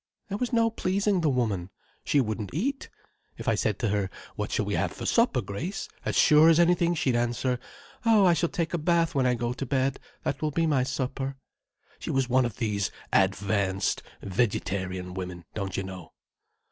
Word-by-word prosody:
"There 200 - -2
was 250 0 -1
no 230 -1 +3
pleasing 195 -2 +1
the 160 - +2
woman. 110 -9 0 0.3
She 145 - +2
wouldn't 110 -2 -2
eat. 270 - -2 0.5
If - - -8
I - - +4
said - - 0
to 115 - -1
her 100 -1 0 0.3
'What - - -3
shall - - 0
we - - -2
have - - 0
for - - -7
supper, - - +3
Grace?' 165 - -4 0.2
as - - -1
sure 155 +1 +7
as 165 0 +5
anything 175 0 +3
she'd 130 -5 +1
answer 120 +1 0 0.4
'Oh, 220 -4 +5
I 175 - +6
shall 165 +1 +1
take 165 -1 -2
a 170 - 0
bath 170 +1 +2
when 130 -2 +2
I 125 - +2
go 120 +1 -2
to 130 - -5
bed—that 135 +1 -2
will 155 - +1
be 165 +3 +1
my 145 -5 +2
supper.' 135 +1 -2 0.6
She - - -6
was 135 -2 +1
one 130 0 +3
of 120 - -4
these 105 -5 0 0.2
advanced 95 0 +1 0.2
vegetarian 95 -3 -1
women, 90 -2 -6
don't 100 -3 -3
you 95 - -1
know." 95 -3 -9
130 Hz, 190 wpm, -27 LUFS, 100-165 Hz, 0.6 s, sure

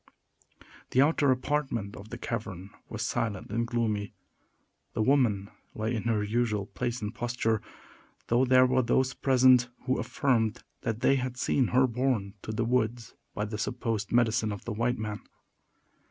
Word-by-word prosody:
The 130 - +4
outer 145 -1 +2
apartment 130 -5 -1
of 105 +2 -11
the 120 - -6
cavern 100 -6 -5 0.2
was - - -4
silent 105 -4 -2
and 115 +2 0
gloomy. 110 -4 -1 0.8
The 110 - 0
woman 110 -7 +2 0.2
lay 110 +2 -1
in 115 -1 -3
her 110 -3 +1
usual 105 -1 0
place 120 +2 -4
and 105 +2 -3
posture, 120 -3 -1 0.6
though 120 +2 +3
there 130 0 +6
were 130 0 +3
those 130 +2 +1
present 130 -2 +4 0.2
who 130 0 +1
affirmed 115 -5 0 0.2
they 120 +4 +2
had 125 -1 -3
seen 130 0 +2
her 130 +1 +4
borne 120 -5 -1
to - - -5
the 110 +1 -1
woods 120 -1 0 0.2
by 105 - -1
the 105 0 -5
supposed 115 -3 -2
"medicine 115 -2 +2
of 100 - -7
the 115 - -3
white 120 +3 0
men." 105 -1 -4
115 Hz, 155 wpm, -29 LUFS, 110-125 Hz, 0.8 s, there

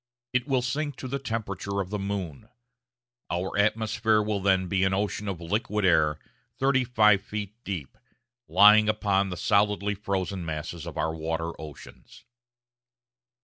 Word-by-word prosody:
It 130 +2 0
will 130 -3 +1
sink 145 +3 -2
to 130 - -7
the 140 +2 -3
temperature 100 -5 -3
of 95 -1 -3
the 105 - -2
moon. 100 -1 -4 0.8
Our 90 +2 -2
atmosphere 110 +1 +2
will 105 -1 -1
then 95 -1 +3
be 95 +1 +1
an 95 0 +2
ocean 105 +1 -2
of 95 -4 -3
liquid 105 +3 -1
air, 75 -4 +3 0.4
35 120 -7 +3
feet 105 -1 -5
deep, 90 -9 -5 0.5
lying 105 +4 +7
upon 100 -2 +1
the 90 - -5
solidly 105 +1 +2
frozen 95 -2 -3
masses 80 0 -5
of - - -7
our 80 - 0
water 80 +1 -3
oceans. 75 -3 -12
100 Hz, 145 wpm, -27 LUFS, 90-110 Hz, 0.8 s, lying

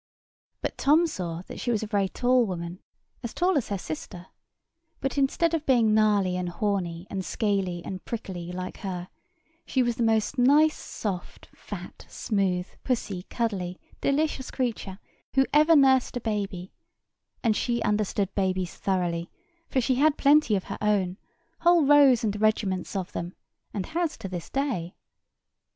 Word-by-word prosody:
But - - -4
Tom 305 +5 +5
saw 175 - -4
that - - -9
she - - -3
was 225 -2 +1
a - - -1
very 200 -3 0
tall 250 0 +2
woman, 175 -1 -5 0.4
as 235 - -6
tall 360 +1 +2
as 280 - +1
her 200 - -1
sister: 175 +1 -7 0.7
but 270 - -2
instead 290 +4 +2
of 325 -2 0
being 235 -5 +4
gnarly 205 -4 +3
and 180 -1 -2
horny, 175 -2 -2
and 190 -1 -2
scaly, 190 -5 -1
and 185 -1 -6
prickly, 180 -6 -5
like 185 0 -5
her, 180 -2 -5 0.5
she 260 - +1
was 240 -1 -1
the - - -2
most 225 +3 +1
nice, 295 +5 +5
soft, 190 -5 -6
fat, - - -9
smooth, 190 -4 0 0.2
pussy, 205 -7 -2
cuddly, 190 -6 -2 0.2
delicious 280 -2 0
creature 225 -7 -3 0.4
who 270 0 +5
ever 310 +2 +6
nursed 265 -3 +4
a - - -2
baby; 200 -5 -3 0.7
and 225 -3 +3
she 240 +1 0
understood 205 -2 0
babies 185 -2 -1
thoroughly, 175 -3 -1 0.4
for 265 - +1
she 260 +2 +1
had 300 +2 +4
plenty 285 -6 +5
of 190 - -1
her - - -7
own, 200 -4 +1 0.4
whole 345 -3 +5
rows 275 -4 +6
and 210 -1 -1
regiments 200 -4 0
of 185 -2 -3
them, 175 +2 -5 0.4
and 195 -3 -3
has 330 -1 -2
to - - -6
this 180 -3 -6
day. 255 -12 -2
210 Hz, 160 wpm, -27 LUFS, 185-260 Hz, 0.7 s, ever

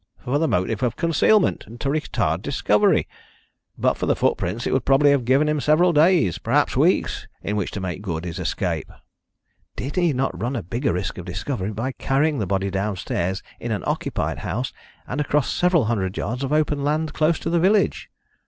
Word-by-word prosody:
"For 135 +4 -1
the 160 - +2
motive 95 +2 0
of 120 -2 0
concealment, 170 - +2
and 115 +2 -11
to - - -2
retard 150 +2 0
discovery. - - +2 0.7
But - - +1
for - - -2
the - - +3
footprints 115 +2 -1
it - - 0
would 130 -2 +1
probably 140 +2 +4
have 140 -4 +1
given 135 +5 +3
him 150 0 +1
several 170 +5 +4
days 155 - +3
perhaps - - +1
weeks - - +1 0.2
in 105 - -2
which 100 -3 -1
to - - -5
make 95 -1 -4
good 85 -4 -4
his 85 +1 -5
escape." 90 -2 -2 0.8
"Did 140 +7 -5
he 175 -3 +3
not 125 -9 -2
run 125 +4 -1
a 115 - -3
bigger 120 - -1
risk 90 +1 -3
of 90 - -7
discovery 95 +3 -3
by 115 +6 -3
carrying 140 +3 0
the 100 - -1
body 95 +1 -1
downstairs 95 -2 -2 0.2
in - - -4
an - - -2
occupied - - -2
house, - - -3 0.3
and 140 +4 -2
across 145 -1 0
several 175 -7 +3
hundred 100 -4 -1
yards 125 +6 -3
of 135 - -2
open 150 -2 +1
land 155 +1 0
close 155 +2 +2
to - - -4
the 170 - +3
village?" 200 +4 +2
130 Hz, 195 wpm, -23 LUFS, 100-150 Hz, 0.8 s, probably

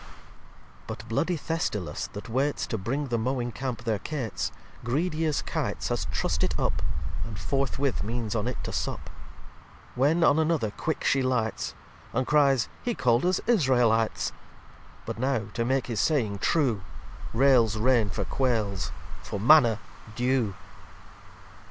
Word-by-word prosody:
li - - -16 0.8
But - - -7
bloody 165 +10 0
Thestylis, 140 - -2
that 105 - -7
waites 135 +5 0
To 115 - -3
bring 135 +8 -2
the 120 -1 0
mowing 120 +1 -1
Camp 125 -1 -4
their 110 -3 0
Cates, 135 -5 -3 0.3
Greedy 155 +6 0
as 150 - 0
Kites - - -2
has - - -1
trust - - -1
it - - 0
up, - - 0 0.4
And 110 -4 -6
forthwith 135 +4 0
means 115 0 -2
on - - 0
it - - -2
to - - -4
sup: - - -3 0.8
When 150 +7 +3
on 150 0 +5
another 155 -9 +1
quick 160 +8 -3
She 135 - +3
lights, 125 -4 -1 0.4
And 130 +2 +1
cryes, 140 -5 +4
he 240 -2 -1
call'd 125 +4 +3
us 185 - +1
Israelites; 125 - +3 0.7
But - - -5
now, 125 -5 0
to 115 - 0
make 130 +1 +1
his 115 -4 -3
saying 110 -10 +1
true, 125 - +2 0.5
Rails 120 -3 +4
rain 115 -2 +3
for 95 - -2
Quails, 105 -9 0 0.3
for 100 - -5
Manna 120 -1 +6 0.4
Dew. 125 -4 +1
125 Hz, 145 wpm, -27 LUFS, 110-140 Hz, 0.8 s, Manna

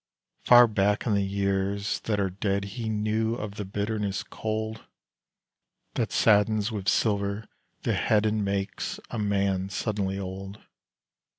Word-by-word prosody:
Far 120 0 +9
back 105 -1 +1
in 110 - +1
the 100 - +3
years 100 0 -1
that 105 -2 0
are 95 -2 0
dead 100 +1 -1
He 110 +3 -4
knew 110 +1 0
of 105 -4 -5
the 105 0 -5
bitterness 100 0 -2
cold 110 0 -4 1.1
That - - -1
saddens 105 +1 +3
with 100 -2 -1
silver 100 0 +1 0.4
the - - +1
head 105 -1 +2
And 110 -1 +1
makes 100 0 -2
a 115 - -3
man 100 -2 0
suddenly 100 -1 -2
old. 95 +1 -6
100 Hz, 135 wpm, -27 LUFS, 100-110 Hz, 1.1 s, Far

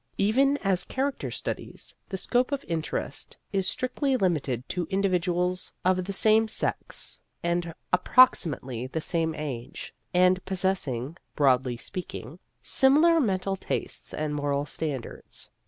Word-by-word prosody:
Even 270 +8 +3
as 190 -3 +2
character 270 +1 -2
studies, - - -5
the 190 - -3
scope 245 +7 +1
of 280 -1 -2
interest 165 -2 -4 0.2
is 195 -2 +1
strictly 260 +1 0
limited 145 - 0
to 175 -3 -2
individuals 180 -2 0
of 185 0 +2
the 200 - -3
same 220 +3 +4
sex 220 - -1 0.2
and 170 -1 -1 0.2
approximately 150 - +3
the 160 - -3
same 160 0 0
age, 135 -6 -6 0.2
and 180 +1 +4
possessing 175 -8 -1 0.2
broadly 130 -3 +3
speaking 175 - -5 0.2
similar 310 +5 +5
mental 195 -6 0
tastes 190 - -4
and 150 -1 -2
moral 145 -1 -1
standards. 145 -5 -6
180 Hz, 125 wpm, -27 LUFS, 150-200 Hz, 0.2 s, similar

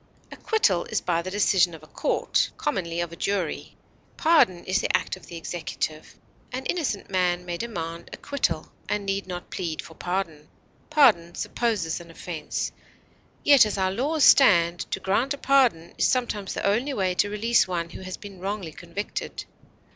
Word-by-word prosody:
Acquittal 205 - +1
is - - -1
by 170 -1 0
the 185 - -5
decision 185 -3 +3
of 155 - -14
a - - -14
court, - - 0
commonly 170 +1 -2
of 170 -1 -3
a - - -8
jury; 185 -2 -2 0.4
pardon 310 - +4
is 190 +2 +1
the - - +3
act - - -5
of 185 - -15
the 170 - -9
executive. 160 -2 -4 0.4
An 260 +1 -4
innocent 280 - -2
man 180 -1 +1
may 175 -1 -3
demand 170 -5 -5
acquittal, 280 - -2 0.2
and 210 -1 -1
need 195 0 -2
not 180 -1 -7
plead 170 -4 -3
for 160 - -7
pardon. 170 -4 -3 0.4
Pardon 225 - +4
supposes 205 -10 -1
an 170 - -13
offense; 165 -2 -4 0.7
yet, 285 -3 +8
as 210 -1 -1
our 190 -1 +1
laws 285 +9 0
stand, 175 -9 +6
to - - -1
grant 235 +9 +1
a - - -15
pardon 255 -13 +2
is - - +4
sometimes 230 -6 -1
the - - -2
only 240 +8 +1
way 185 -2 +1
to 205 +3 +1
release 225 +2 +2
one 170 -2 -3
who - - -9
has 185 0 -6
been 200 -3 -11
wrongly 195 -3 -4
convicted. 175 +6 -5
190 Hz, 170 wpm, -25 LUFS, 170-220 Hz, 0.7 s, yet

